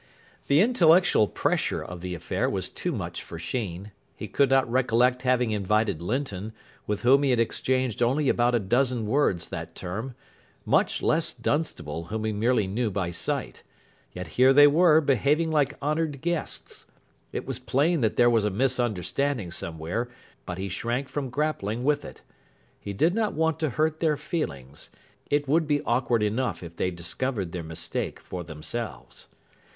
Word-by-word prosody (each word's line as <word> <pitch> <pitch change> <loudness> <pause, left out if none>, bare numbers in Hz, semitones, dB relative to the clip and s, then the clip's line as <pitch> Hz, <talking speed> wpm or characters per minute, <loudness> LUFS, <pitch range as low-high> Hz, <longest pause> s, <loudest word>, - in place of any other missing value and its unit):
The 140 +4 +5
intellectual 180 - +5
pressure - - -1
of 90 -1 -8
the 90 0 -4
affair 85 - -1
was - - -2
too - - -3
much - - -4
for 85 - -9
Sheen. 100 +1 -4 0.2
He 105 - -6
could 140 +5 +2
not 135 -1 +4
recollect 125 0 +2
having 125 -2 +2
invited 105 -3 0
Linton, 110 -1 -3 0.3
with 105 +2 -2
whom 135 +3 +6
he 140 - +2
had 125 -2 +3
exchanged 130 0 0
only 135 +5 +2
about 120 0 +3
a - - +3
dozen 120 +3 +1
words 105 - +1
that 85 +1 -6
term, 110 +8 -5 0.5
much - - +2
less 160 +1 +2
Dunstable, 85 - -2
whom 110 +4 -4
he 110 - 0
merely 110 +1 +1
knew 110 +5 -1
by 95 -3 -2
sight. 85 - -2 0.5
Yet 90 -2 -7
here 130 +7 +5
they 145 +1 +8
were, 160 +2 +5
behaving 145 +3 +2
like 150 -3 +1
honoured 150 -2 -1
guests. 170 -1 -4 0.4
It - - -4
was 130 -2 -3
plain 145 +5 +1
that 110 -2 +1
there 120 - +5
was 115 -3 +3
a 105 - +1
misunderstanding 120 - -1
somewhere, 85 +8 -4 0.4
but 90 - -4
he 95 +1 -3
shrank 120 +8 -2
from 135 0 -3
grappling 120 -5 -2
with 145 +1 +1
it. - - -11 0.6
He 100 - -6
did 160 - +2
not 220 0 0
want 160 0 +1
to 155 - 0
hurt 155 +4 0
their 155 -3 +2
feelings. 70 - -5 0.4
It 145 0 +1
would 155 +3 +2
be 145 -1 +1
awkward 120 -2 +1
enough 115 +1 -1
if 85 0 -9
they 90 - 0
discovered 90 +4 -3
their 90 - -4
mistake 80 0 -4
for 90 -1 -7
themselves. 85 +9 -6
120 Hz, 165 wpm, -26 LUFS, 100-145 Hz, 0.6 s, they